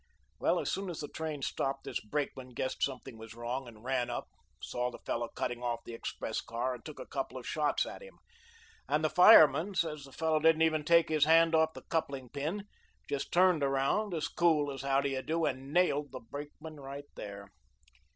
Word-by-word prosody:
Well, -, -, +2 dB
as -, -, -2 dB
soon 195 Hz, -1 st, -2 dB
as 170 Hz, -, -5 dB
the 145 Hz, -, -4 dB
train 155 Hz, -3 st, -5 dB
stopped, 135 Hz, +1 st, -2 dB
this -, -, -3 dB
brakeman 130 Hz, 0 st, -4 dB
guessed 130 Hz, -, -3 dB
something 130 Hz, -3 st, -3 dB
was 115 Hz, 0 st, -10 dB
wrong 120 Hz, +3 st, -4 dB
and 110 Hz, -2 st, -13 dB
ran 125 Hz, -1 st, 0 dB
up, 120 Hz, -, -4 dB, 0.3 s
saw 125 Hz, 0 st, -2 dB
the 125 Hz, -, -9 dB
fellow 120 Hz, 0 st, -3 dB
cutting 120 Hz, +1 st, -4 dB
off 120 Hz, -1 st, -2 dB
the 120 Hz, -, -7 dB
express 115 Hz, -, -4 dB
car 120 Hz, +3 st, -2 dB
and 120 Hz, -, -9 dB
took 155 Hz, -, -9 dB
a -, -, -6 dB
couple 135 Hz, -1 st, -4 dB
of 125 Hz, -, -8 dB
shots 150 Hz, -1 st, +1 dB
at -, -, -8 dB
him, -, -, -13 dB, 0.7 s
and 150 Hz, +2 st, +2 dB
the 155 Hz, -, +1 dB
fireman 180 Hz, +1 st, +7 dB
says 155 Hz, -5 st, -1 dB
the 135 Hz, -, -12 dB
fellow 160 Hz, +2 st, +1 dB
didn't 160 Hz, +1 st, +4 dB
even 155 Hz, -1 st, +2 dB
take 170 Hz, +1 st, +5 dB
his 155 Hz, -2 st, +3 dB
hand 165 Hz, +1 st, +5 dB
off 160 Hz, 0 st, +3 dB
the -, -, -9 dB
coupling 140 Hz, -6 st, -2 dB
pin; 160 Hz, -, -3 dB, 0.4 s
just 140 Hz, -, -3 dB
turned 180 Hz, -2 st, +4 dB
around 140 Hz, +9 st, +1 dB
as 155 Hz, -, -1 dB
cool 155 Hz, -4 st, +2 dB
as 135 Hz, -, -6 dB
how 135 Hz, 0 st, +2 dB
do 140 Hz, -, 0 dB
you 135 Hz, -1 st, -2 dB
do 165 Hz, +3 st, 0 dB
and 135 Hz, +2 st, -3 dB
NAILED 150 Hz, -4 st, +2 dB
the 130 Hz, -, -6 dB
brakeman 145 Hz, +5 st, -9 dB
right 140 Hz, +1 st, -7 dB
there. 100 Hz, -1 st, -8 dB
145 Hz, 210 wpm, -32 LUFS, 130-160 Hz, 0.7 s, fireman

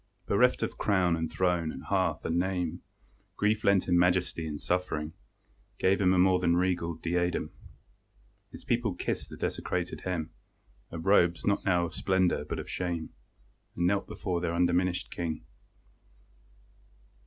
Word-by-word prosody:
Bereft -, -, +3 dB
of -, -, -4 dB
crown, 90 Hz, -4 st, +2 dB
and 80 Hz, -1 st, -3 dB
throne, 90 Hz, -3 st, +1 dB
and -, -, -8 dB
hearth -, -, 0 dB
and 85 Hz, +1 st, +1 dB
name, 90 Hz, -2 st, -1 dB, 0.5 s
Grief 105 Hz, +1 st, +1 dB
lent 100 Hz, -2 st, +3 dB
him 90 Hz, -1 st, +4 dB
majesty, 90 Hz, -2 st, +1 dB
and 75 Hz, -1 st, -4 dB
suffering 80 Hz, -4 st, -2 dB, 0.6 s
Gave 95 Hz, +2 st, +2 dB
him 90 Hz, -1 st, +4 dB
a 95 Hz, -, +3 dB
more 90 Hz, 0 st, +4 dB
than 85 Hz, -1 st, +2 dB
regal 90 Hz, -2 st, 0 dB
diadem. 90 Hz, +2 st, -1 dB, 1.0 s
His -, -, -12 dB
people 115 Hz, -5 st, 0 dB
kissed -, -, -3 dB
the -, -, -9 dB
desecrated 90 Hz, -1 st, -3 dB
hem 85 Hz, -4 st, -3 dB, 0.6 s
Of 80 Hz, +1 st, -7 dB
robes 85 Hz, -4 st, +3 dB
not 100 Hz, -, +1 dB
now 90 Hz, -2 st, +3 dB
of -, -, -7 dB
splendour 95 Hz, -2 st, +1 dB
but -, -, -4 dB
of -, -, -6 dB
shame, 85 Hz, -3 st, -3 dB, 0.6 s
And 85 Hz, -, 0 dB
knelt 100 Hz, +2 st, +1 dB
before 90 Hz, -4 st, -3 dB
their 85 Hz, -1 st, -1 dB
undiminished 90 Hz, +1 st, +1 dB
King. 80 Hz, -6 st, -4 dB
90 Hz, 150 wpm, -29 LUFS, 85-95 Hz, 1.0 s, him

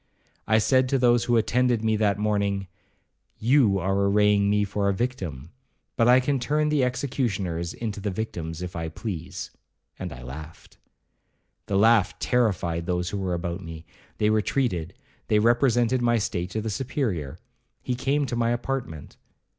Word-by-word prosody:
I 110 Hz, -, +4 dB
said 130 Hz, +3 st, +3 dB
to 135 Hz, -, +2 dB
those 120 Hz, -2 st, +3 dB
who 120 Hz, -1 st, +3 dB
attended 120 Hz, 0 st, +2 dB
me 110 Hz, -1 st, +2 dB
that 105 Hz, -2 st, +2 dB
morning, 100 Hz, -2 st, 0 dB, 0.7 s
'You 115 Hz, -4 st, +3 dB
are 95 Hz, +1 st, 0 dB
arraying 100 Hz, 0 st, +3 dB
me 105 Hz, 0 st, +2 dB
for 100 Hz, 0 st, -1 dB
a -, -, +2 dB
victim, 90 Hz, -, -4 dB, 0.4 s
but 115 Hz, -, +3 dB
I 125 Hz, +1 st, +7 dB
can 135 Hz, +1 st, 0 dB
turn 150 Hz, +4 st, +1 dB
the 150 Hz, -3 st, +2 dB
executioners 115 Hz, -10 st, -2 dB
into 110 Hz, -3 st, -4 dB
the 100 Hz, +1 st, -2 dB
victims 90 Hz, -5 st, -5 dB
if 90 Hz, -1 st, -6 dB
I 80 Hz, -1 st, -3 dB
please'—and 90 Hz, -1 st, -8 dB
I -, -, -9 dB
laughed. 75 Hz, +5 st, -10 dB, 0.9 s
The 100 Hz, -, 0 dB
laugh 110 Hz, -2 st, +4 dB
terrified 90 Hz, -9 st, 0 dB
those 90 Hz, 0 st, -1 dB
who 100 Hz, -, -3 dB
were 95 Hz, -2 st, -1 dB
about 85 Hz, +1 st, -4 dB
me—they 85 Hz, +6 st, -4 dB
retreated—they 105 Hz, -, -1 dB
represented 120 Hz, +2 st, +3 dB
my 120 Hz, -1 st, +3 dB
state 90 Hz, -4 st, -2 dB
to 110 Hz, -, -3 dB
the 110 Hz, 0 st, -3 dB
Superior. 110 Hz, -, -2 dB, 0.5 s
He 125 Hz, -, -1 dB
came 140 Hz, +3 st, 0 dB
to 120 Hz, -2 st, -3 dB
my 115 Hz, -1 st, +1 dB
apartment. 120 Hz, -, -4 dB
105 Hz, 155 wpm, -25 LUFS, 90-120 Hz, 0.9 s, I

